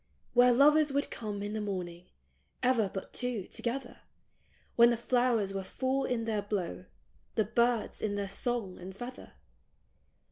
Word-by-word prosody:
" - - -39
Where 245 0 +6
lovers 295 +4 +5
would 280 +1 0
come 205 -3 -4
in 205 +1 -4
the 215 - -2
morning 180 -3 -5 0.3
— 70 +2 -28
ever 225 -6 +1
but 190 - -6
two, 245 -6 -2
together; 245 +2 -4 0.8
When 235 0 +7
the 240 - +1
flowers 235 -4 +1
were 195 - -2
full 260 +7 -1
in 230 -2 -1
their 215 -2 0
blow; 195 -3 -3 0.5
the 220 - +2
birds, 235 +1 +1
in 205 -2 -1
their 200 -1 -2
song 200 -1 -2
and 185 +1 -8
feather. 245 +4 -8
225 Hz, 165 wpm, -31 LUFS, 200-245 Hz, 0.8 s, When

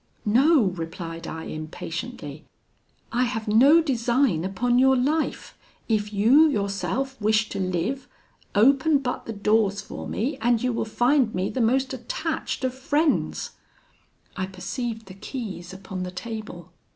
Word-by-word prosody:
'No!' 265 +6 +5
replied 165 -1 -6
I, 160 0 -6
impatiently, 155 -1 -6 0.7
'I 245 +2 +2
have 225 -3 -3
no 275 +10 +6
design 240 - +1
upon 240 +6 +1
your 265 0 +5
life, 300 +5 -1 0.3
if 210 -2 0
you, 245 +10 +5
yourself, 200 - -2
wish 215 +1 +2
to - - -4
live; 185 +8 -2 0.5
open 275 +7 +5
but 255 -3 -4
the 225 - -3
doors 210 -1 +2
for - - -7
me, 260 +6 -2
and 235 0 +3
you 250 -1 +1
will 225 - -1
find 240 +1 +2
me 185 +1 -1
the 260 - -1
most 260 +3 +2
attached 310 +3 -3
of 255 -1 0
friends.' 290 +4 0 0.8
I 185 0 -2
perceived 220 +5 -5
the 185 - -11
keys 195 -4 -6
upon 190 -1 -7
the 180 - -3
table. 185 -3 -7
225 Hz, 140 wpm, -25 LUFS, 190-265 Hz, 0.8 s, no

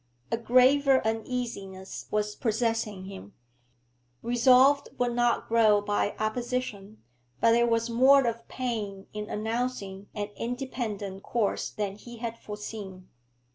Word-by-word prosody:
A 230 - +1
graver 260 +3 +4
uneasiness 220 -4 -4
was 210 0 -1
possessing 225 -4 -1
him. 190 - -10 0.9
Resolve 255 +4 +5
would 245 -1 +1
only 240 0 +2
grow 220 -2 +5
by 205 0 -1
opposition, 215 -2 -3 0.4
but 230 - +5
there 235 +1 +4
was 230 0 +1
more 260 +3 +5
of 230 0 -3
pain 215 -6 -4
in 210 0 -5
announcing 215 -3 -3
an 205 -1 -3
independent 230 -6 -4
course 225 -2 -1
than 200 -1 -4
he 240 +2 -11
had 230 0 -5
foreseen. 205 -3 -8
225 Hz, 120 wpm, -28 LUFS, 205-245 Hz, 0.9 s, Resolve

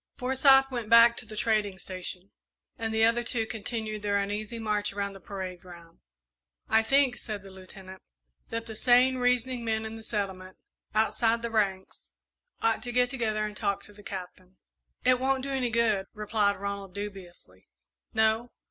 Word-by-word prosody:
Forsyth 270 +1 +5
went 235 -4 -4
back 230 0 +8
to - - -4
the 215 - -9
trading 210 -3 +1
station, 185 +1 -7 0.4
and 225 -1 -3
the 220 0 +2
other 230 +1 +3
two 235 -2 -1
continued 220 -1 -4
their 205 -1 +1
uneasy 210 +3 -3
march 210 -2 -1
around 200 0 -3
the 195 - -11
parade 185 -2 -6
ground. 170 -2 -14 0.7
"I 220 - +4
think," 265 +2 +3
said 210 -3 -6
the 195 - -12
Lieutenant, 190 0 -12 0.5
"that 230 0 -4
the 225 - -7
sane, 250 +3 +4
reasoning 250 0 +1
men 220 -1 -1
in 220 +1 -6
the 225 - -10
settlement, 190 -4 -4 0.4
outside 225 +1 +2
the 235 - -2
ranks, 195 -4 -1 0.5
ought 225 -1 +2
to 245 +2 -4
get 245 0 +2
together 215 -5 -1
and 210 -1 -6
talk 200 -1 -1
to 205 - -7
the 205 - -15
Captain." 185 -1 -8 0.5
"It 255 0 +5
won't 265 0 +1
do 275 - -3
any 260 -2 0
good," 220 -4 +1
replied 210 -1 +1
Ronald, 200 -1 -5
dubiously. 180 - -9 0.4
"No? 220 +2 +2
215 Hz, 170 wpm, -28 LUFS, 200-235 Hz, 0.7 s, back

